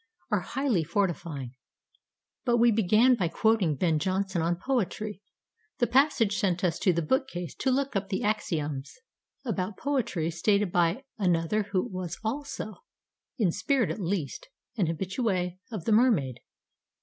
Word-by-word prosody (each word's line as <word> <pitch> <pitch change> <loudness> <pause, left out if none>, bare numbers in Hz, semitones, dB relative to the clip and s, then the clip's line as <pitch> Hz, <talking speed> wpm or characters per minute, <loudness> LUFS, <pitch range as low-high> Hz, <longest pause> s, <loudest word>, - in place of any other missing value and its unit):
are - - +3
highly 265 - 0
fortifying. 170 -7 -2 0.9
But 240 -3 +2
we 235 0 +5
began 220 +4 +4
by 190 -8 +1
quoting 200 -4 +2
Ben 160 0 +1
Jonson 190 +1 0
on 170 +2 +1
poetry. 215 -1 -2 0.6
The 240 - +3
passage 240 -5 +3
sent 185 -1 0
us 175 -2 +1
to 185 - +3
the 170 -1 0
bookcase 180 - -1
to 265 - 0
look 270 0 0
up 195 0 -1
the 190 - -1
"axioms" 155 -9 -2 0.5
about 195 -4 -2
poetry 225 - -1
stated 200 +3 +1
by 175 +9 +2 0.2
another 185 +2 +1
who 185 -2 +1
was 185 -6 -5
also, 240 -2 -4 0.6
in 205 -8 +2
spirit 225 +7 +1
at - - -5
least, 185 - -3 0.3
an 195 -8 +1
habitué 185 +1 -1
of 210 -7 -5
The - - +1
Mermaid. 210 - +3
195 Hz, 145 wpm, -28 LUFS, 170-225 Hz, 0.9 s, we